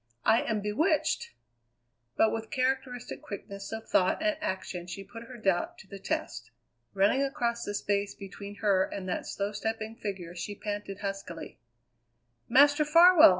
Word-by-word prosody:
"I 225 +1 +5
am 215 -2 -1
bewitched!" 295 +9 +1 0.9
But 220 - +5
with 225 0 -4
characteristic 255 -1 -1
quickness 200 0 -7
of 225 0 -5
thought 185 - +3
and 315 -1 +2
action 185 - -3
she 180 +2 -6
put 230 +4 -10
her 245 +1 -10
doubt 195 -5 0
to - - -14
the 200 0 -9
test. 120 -9 -3 0.5
Running 200 +7 +4
across 240 -4 -1
the 205 - -3
space 205 0 0
between 200 +1 -8
her 190 -2 +5
and 190 -1 -5
that 180 - -2
slow 200 +1 -2
stepping 220 +1 -3
figure 190 -6 -5
she 180 +4 -5
panted 205 -1 -5
huskily: 195 -4 -5 0.9
"Master 290 +3 +6
Farwell! 335 +2 +8
210 Hz, 150 wpm, -30 LUFS, 195-245 Hz, 0.9 s, Farwell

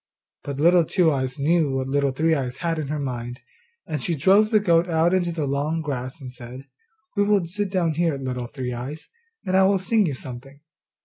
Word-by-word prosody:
But 140 -1 -5
little 170 +3 +5
Two 165 0 +2
eyes 130 -1 -2
knew 150 -1 +2
what 130 0 -2
Little 140 0 +1
Three 160 +5 +1
eyes 130 -4 -2
had 165 -2 -1
in 150 - -3
her 150 +2 -2
mind, 125 -3 -4 0.5
and 150 -3 -4
she 170 - -1
drove 195 +8 +4
the 215 -2 +4
goat 175 -3 +2
out 165 +2 +2
into 175 -2 +1
the 160 -3 -2
tall 145 +4 -1
grass 135 -2 -4
and 130 -3 -8
said, 125 +2 -9 0.5
'We 205 -1 +3
will 205 -3 +2
sit 200 +4 -3
down 175 -4 0
here, 165 -2 0
Little 125 -2 -4
Three 125 -1 -5
eyes, 130 +6 -7 0.4
and 185 -1 0
I 190 - +6
will 195 +1 +3
sing 205 +1 +2
you 145 - -2
something. 130 +2 -10
155 Hz, 210 wpm, -23 LUFS, 135-175 Hz, 0.5 s, I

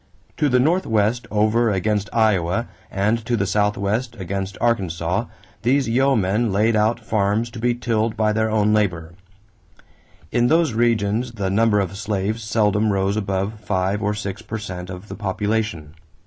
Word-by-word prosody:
To 150 -2 +2
the 125 -1 +3
northwest 120 - +1
over 110 +2 +2
against 105 +1 0
Iowa 110 -1 +1 0.2
and 105 +4 0
to 120 +1 0
the 100 - 0
southwest 105 +4 0
against 95 +1 -4
Arkansas, 95 -9 0 0.4
these 130 +3 +2
yeomen 115 -4 +2
laid 110 +4 +2
out 110 +3 +2
farms 110 +2 0
to 115 - -8
be 120 +1 +1
tilled 115 -2 -1
by 110 -1 +2
their 110 +1 +1
own 105 -1 +2
labor. 85 -6 0 1.2
In 120 0 +2
those 160 -2 +3
regions 115 +1 +1
the 100 -4 -2
number 105 0 +3
of 100 0 -2
slaves 105 +1 -2
seldom 105 -1 +1
rose 95 0 0
above 100 +1 -2
five 100 0 -1
or 105 0 0
six 105 0 -5
per 110 0 -5
cent 90 -4 -7
of 90 +2 -8
the - - -7
population. 105 -5 -2
105 Hz, 155 wpm, -21 LUFS, 100-115 Hz, 1.2 s, the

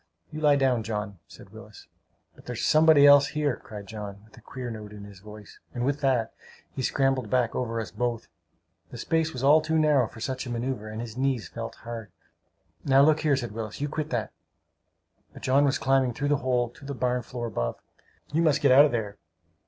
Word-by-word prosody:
"You 155 - -6
lie 145 -2 +5
down, 130 -4 +2
John," 105 -3 -5
said - - -15
Willis. - - -13 0.5
"But - - -19
there's - - -3
somebody 155 -2 +6
else 145 -1 +7
here!" 150 -4 -1
cried 105 -2 -9
John, 100 -1 -8
with 110 - -20
a - - -16
queer 125 -2 -7
note 105 -2 -8
in 105 -1 -10
his 100 -2 -12
voice; 105 +1 -13 0.2
and 120 0 -1
with 140 +2 -1
that, 130 -5 +1 0.4
he - - -5
scrambled 135 -3 0
back 125 -1 +1
over 115 -2 -2
us 110 - -5
both. 120 +1 -3 0.6
The - - -9
space 160 -1 0
was 130 -2 -6
all 150 +3 +6
too 160 +1 0
narrow 150 -6 +3
for 115 - -13
such 130 +2 -4
a - - -6
maneuvre, 120 -2 -4
and 110 +1 -5
his 120 0 -8
knees 130 -8 -1
felt - - -7
hard. 115 -4 -7 0.7
"Now 135 0 +5
look 155 +1 +4
here," 150 -3 +2
said 120 -4 -4
Willis. 110 -1 -6
"You 145 +1 -2
quit 155 +1 -4
that!" 120 -3 -2 1.0
But - - -13
John 140 +2 +3
was 140 0 +1
climbing 130 0 +1
through 145 0 -2
the 145 - +3
hole 125 -3 0
to 150 - -18
the 140 0 -6
barn 125 0 0
floor 120 0 -6
above. 65 - -3 0.6
"You 160 - +2
must 155 -3 +3
get 140 - +4
out 140 +3 +8
of 150 - 0
there!" 105 -4 -3
125 Hz, 215 wpm, -26 LUFS, 110-140 Hz, 1.0 s, out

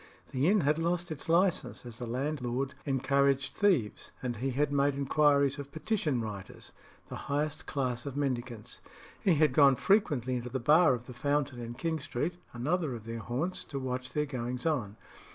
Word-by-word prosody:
The 135 +3 +1
inn 205 +1 +4
had 150 +2 +2
lost 170 +1 -1
its 155 +1 -5
licence, 175 -5 +2
as 115 -2 -7
the 120 - -4
landlord 130 0 -2
encouraged 140 0 +2
thieves; 180 - +1
and 120 -2 -2
he 130 +4 -1
had 140 +3 0
made 140 0 +2
inquiries 140 0 +3
of 140 0 -7
petition 160 - -1
writers, 100 -4 -7 0.4
the - - -5
highest 150 +2 -1
class 125 -2 -2
of 140 0 -5
mendicants. 125 -5 -3 0.4
He 185 -4 +3
had 150 -3 +3
gone 140 -1 +6
frequently 130 - +2
into 125 0 -5
the 130 +2 -2
bar 150 +3 +5
of 120 - -8
the 125 - -9
Fountain 140 0 -1
in 120 0 -6
King 160 +4 -2
Street, 150 +6 -3
another 145 +3 -1
of 115 - -8
their 115 0 -5
haunts, 135 +11 -3
to 140 - -6
watch 130 -1 -3
their 150 0 +1
goings 125 -1 -4
on. 120 -10 -1
140 Hz, 180 wpm, -31 LUFS, 125-150 Hz, 0.4 s, gone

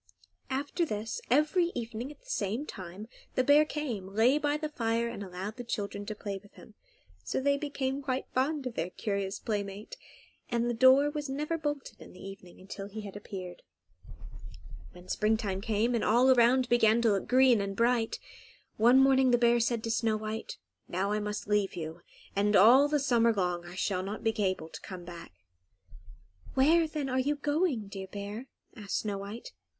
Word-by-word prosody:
After 280 +6 -1
this, 220 -6 -3
every 305 +7 +3
evening 235 +2 -4
at 300 - -16
the - - -29
same 230 - -2
time 190 - -8 0.3
the 255 - +3
bear 290 +3 +6
came, 255 -12 -4
lay 225 +8 +3
by 295 0 0
the 305 0 -4
fire, 230 -4 0
and 235 -3 -6
allowed 190 +4 -6
the 245 - -5
children 205 -3 -4
to 215 - -4
play 200 -1 -5
with 205 - -20
him; 220 - -15 0.5
so - - -2
they 280 +1 +2
became 280 -2 -3
quite 260 -1 -2
fond 275 +2 0
of 250 - -3
their 170 -4 -2
curious 200 0 -3
playmate, 205 - -4 0.5
and 235 -1 0
the 240 - 0
door 260 +4 +5
was 295 -2 -4
not 275 +2 -2
ever 330 +2 -1
bolted 295 -3 -4
in - - -12
the 180 - -14
evening 195 -2 -11
until 195 +1 -8
he 215 +2 -7
had 200 -2 -9
appeared. 185 -3 -8 1.3
When 180 0 -14
springtime 210 -2 0
came, 225 +2 0
and 235 - 0
all 245 +4 +5
around 250 +1 +4
began 230 -2 +4
to 225 - +4
look 195 -1 -1
green 255 -3 +5
and 195 0 -3
bright, 235 0 +1 0.6
one 240 +4 +6
morning 265 -1 +5
the 245 - +5
bear 240 0 +4
said 230 -1 0
to 230 - -2
Snow 225 -1 +1
White, 215 +1 -5 0.3
"Now 190 +3 -1
I 210 - +1
must 210 0 -4
leave 210 -2 +1
you, 165 0 -6 0.3
and 205 +1 +2
all 245 +9 +7
the 300 0 +1
summer 235 -4 +3
long 180 -4 -1
I 175 +1 -10
shall 190 -1 -1
not 200 +3 -5
be 225 - +2
able 185 -4 -1
to - - -10
come 180 -2 -8
back." 170 -1 -10 1.2
"Where, 320 +5 +4
then, 305 -3 -3
are 260 0 0
you 285 +3 +1
going, 290 - 0
dear 195 -1 -7
bear?" 205 +5 -7 0.3
asked 205 -3 -3
Snow 205 -2 -3
White. 205 +4 -8
225 Hz, 190 wpm, -30 LUFS, 200-265 Hz, 1.3 s, all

